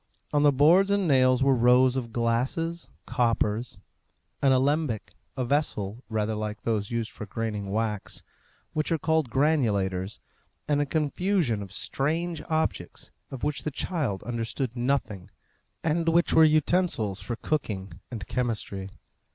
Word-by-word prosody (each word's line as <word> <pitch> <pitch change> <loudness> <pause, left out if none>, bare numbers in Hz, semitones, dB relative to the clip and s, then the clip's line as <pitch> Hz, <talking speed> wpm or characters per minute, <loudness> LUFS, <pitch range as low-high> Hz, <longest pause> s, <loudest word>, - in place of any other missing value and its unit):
On 145 - +3
the 145 0 +6
boards 165 +8 +5
and 200 -2 +2
nails 130 -2 +4
were 135 0 +4
rows 125 +1 +5
of 120 -3 -3
glasses, 125 +9 -1 0.2
coppers, 115 -2 0 0.6
an 135 - +4
alembic, 130 - +1 0.2
a 130 - 0
vessel 120 -5 -1
rather 110 -1 -1
like 105 0 -4
those 105 -3 -1
used 115 -1 -2
for 105 - -8
graining 105 -4 -3
wax, 105 0 -2 0.5
which 155 +1 -1
are 165 - +3
called 160 -3 +1
granulators, 105 -9 +1 0.5
and 145 -1 +2
a 145 - -1
confusion 155 - 0
of 100 -2 -8
strange 160 +10 -1
objects 155 - -2 0.2
of 135 - -8
which 145 -3 0
the 155 - -2
child 145 - -2
understood 120 +1 -3
nothing, 120 -7 -1 0.5
and 165 +1 +1
which 170 +1 +3
were 160 - +7
utensils 155 - +2
for 120 +4 -4
cooking 105 - -3 0.2
and 110 -4 -6
chemistry. 105 -6 -3
130 Hz, 140 wpm, -27 LUFS, 110-150 Hz, 0.6 s, were